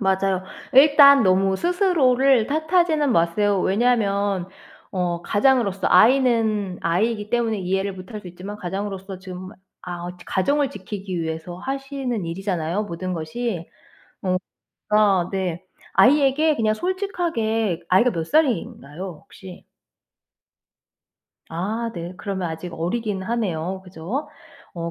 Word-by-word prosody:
맞아요. 190 Hz, -1 st, +1 dB, 0.3 s
일단 280 Hz, -1 st, +8 dB
너무 190 Hz, 0 st, +3 dB
스스로를 275 Hz, -, +3 dB
탓하지는 315 Hz, -2 st, +2 dB
마세요. 190 Hz, +4 st, +2 dB
왜냐하면 200 Hz, -4 st, +1 dB, 0.4 s
어 175 Hz, -3 st, -2 dB
가장으로서 205 Hz, -4 st, +2 dB
아이는 220 Hz, -6 st, +3 dB
아이이기 210 Hz, +5 st, 0 dB
때문에 230 Hz, -3 st, 0 dB
이해를 190 Hz, +2 st, -1 dB
못 185 Hz, +2 st, -11 dB
할 210 Hz, -, -5 dB
수 185 Hz, -, -13 dB
있지만 185 Hz, +4 st, -8 dB
가장으로서 195 Hz, 0 st, -5 dB
지금 185 Hz, 0 st, -8 dB, 0.3 s
아 175 Hz, -1 st, -6 dB, 0.2 s
가정을 280 Hz, +8 st, +1 dB
지키기 190 Hz, -5 st, -6 dB
위해서 160 Hz, +2 st, -5 dB
하시는 270 Hz, -5 st, -4 dB
일이잖아요 180 Hz, +1 st, -2 dB
모든 185 Hz, 0 st, -5 dB
것이. 170 Hz, +3 st, -4 dB, 0.5 s
어 185 Hz, -1 st, +1 dB, 0.5 s
그러니까 200 Hz, -4 st, +3 dB
네 185 Hz, -2 st, -3 dB, 0.3 s
아이에게 295 Hz, +3 st, +4 dB
그냥 215 Hz, -1 st, +2 dB
솔직하게 230 Hz, -, -1 dB
아이가 230 Hz, +7 st, +4 dB
몇 165 Hz, -2 st, -3 dB
살인가요 185 Hz, -, -1 dB
혹시? 185 Hz, -2 st, -13 dB, 1.9 s
아 215 Hz, +8 st, -3 dB
네. 170 Hz, 0 st, -6 dB
그러면 190 Hz, -2 st, -3 dB
아직 165 Hz, +2 st, -6 dB
어리기는 195 Hz, +3 st, -2 dB
하네요. 190 Hz, -5 st, -2 dB
그죠? 185 Hz, -, -5 dB, 0.5 s
어 170 Hz, 0 st, -4 dB
200 Hz, 285 characters per minute, -22 LUFS, 180-245 Hz, 1.9 s, 일단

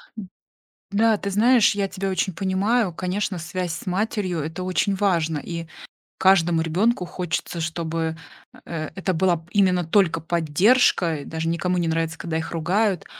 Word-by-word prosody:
М, 205 Hz, -4 st, -8 dB, 0.6 s
да, 220 Hz, +2 st, +3 dB
ты 200 Hz, -1 st, -4 dB
знаешь, 225 Hz, +2 st, +4 dB
я 200 Hz, -1 st, -1 dB
тебя 195 Hz, 0 st, -3 dB
очень 190 Hz, -1 st, -1 dB
понимаю. 195 Hz, +2 st, +1 dB
Конечно, 185 Hz, +2 st, -2 dB
связь 175 Hz, +1 st, -4 dB
с 170 Hz, -, -8 dB
матерью- 185 Hz, -2 st, -1 dB
это 160 Hz, +4 st, -5 dB
очень 185 Hz, +2 st, 0 dB
важно, 170 Hz, -6 st, +1 dB
и 170 Hz, +2 st, -6 dB, 0.5 s
каждому 175 Hz, -3 st, +4 dB
ребенку 180 Hz, +5 st, +1 dB
хочется, 175 Hz, -1 st, -4 dB
чтобы, 165 Hz, 0 st, -3 dB, 0.5 s
э, 155 Hz, -2 st, -4 dB
это 190 Hz, -1 st, -1 dB
была 175 Hz, 0 st, +2 dB
б 160 Hz, -, -15 dB
именно 185 Hz, -3 st, +3 dB
только 165 Hz, -2 st, +2 dB
поддержка. 170 Hz, -, +2 dB
И 140 Hz, -, -8 dB
даже 160 Hz, 0 st, -4 dB
никому 180 Hz, +2 st, 0 dB
не 170 Hz, -1 st, 0 dB
нравится, 160 Hz, 0 st, -1 dB
когда 160 Hz, -1 st, -3 dB
их 160 Hz, -, -4 dB
ругают. 180 Hz, +3 st, 0 dB
180 Hz, 160 wpm, -23 LUFS, 165-195 Hz, 0.6 s, знаешь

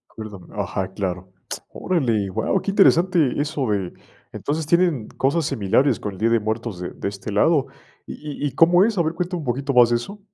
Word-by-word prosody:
Perdón, 105 Hz, -5 st, -9 dB
ajá, 95 Hz, 0 st, -3 dB
claro, 95 Hz, -2 st, -4 dB, 0.4 s
órale, 115 Hz, -, 0 dB
guau, 185 Hz, -, 0 dB
qué -, -, -3 dB
interesante 175 Hz, -7 st, +3 dB
eso 145 Hz, -3 st, -2 dB
de, 95 Hz, -4 st, -1 dB, 0.4 s
entonces, 155 Hz, +2 st, -3 dB
tienen 170 Hz, -8 st, +2 dB
cosas 140 Hz, +4 st, 0 dB
similares 130 Hz, +1 st, +1 dB
con 105 Hz, -, -5 dB
el -, -, -11 dB
día 115 Hz, -, +2 dB
de 115 Hz, 0 st, +3 dB
muertos 110 Hz, -2 st, -3 dB
de 90 Hz, -, -5 dB
de -, -, -5 dB
este 100 Hz, +1 st, -7 dB
lado, 140 Hz, +6 st, +3 dB, 0.4 s
¿y 145 Hz, -1 st, -6 dB
y -, -, +2 dB
y -, -, -4 dB
cómo 175 Hz, +4 st, +6 dB
es?, 220 Hz, -2 st, +1 dB
a -, -, +4 dB
ver, 160 Hz, +1 st, -1 dB
cuéntame 180 Hz, +1 st, -3 dB
un 150 Hz, -, -7 dB
poquito 135 Hz, +3 st, -1 dB
más 120 Hz, -1 st, +6 dB
de 120 Hz, -, +2 dB
eso. 200 Hz, -, -5 dB
135 Hz, 205 wpm, -22 LUFS, 105-165 Hz, 0.4 s, cómo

